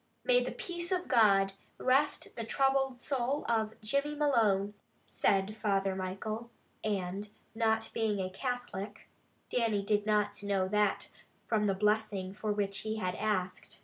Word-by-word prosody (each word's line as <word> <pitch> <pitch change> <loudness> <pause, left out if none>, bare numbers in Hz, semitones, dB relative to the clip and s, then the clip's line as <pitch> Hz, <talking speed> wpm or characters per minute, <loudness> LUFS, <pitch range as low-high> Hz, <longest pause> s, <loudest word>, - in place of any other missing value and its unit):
"May - - +4
the - - -3
peace 355 -7 -5
of 365 -1 0
God 195 -5 +5 0.2
rest 270 +3 +1
the 230 - -3
troubled 270 +2 +1
soul 270 +2 -1
of 220 -2 0
Jimmy 280 +7 0
Malone," 215 -9 +2 0.3
said 195 +1 +1
Father 195 -3 +1
Michael, 215 +5 -4 0.3
and 200 0 -2 0.2
not 225 -1 +1
being 215 -3 0
a 185 -1 -2
Catholic, 215 -2 -4 0.4
Dannie 220 -5 +1
did 210 0 +1
not 210 -1 +1
know 200 -2 +1
that 210 -1 +1 0.4
from 210 -2 +1
the 195 - +2
blessing 210 -2 0
for 210 +1 -2
which 200 -1 -1
he 220 0 -3
asked. 185 0 -2
215 Hz, 140 wpm, -32 LUFS, 200-240 Hz, 0.4 s, God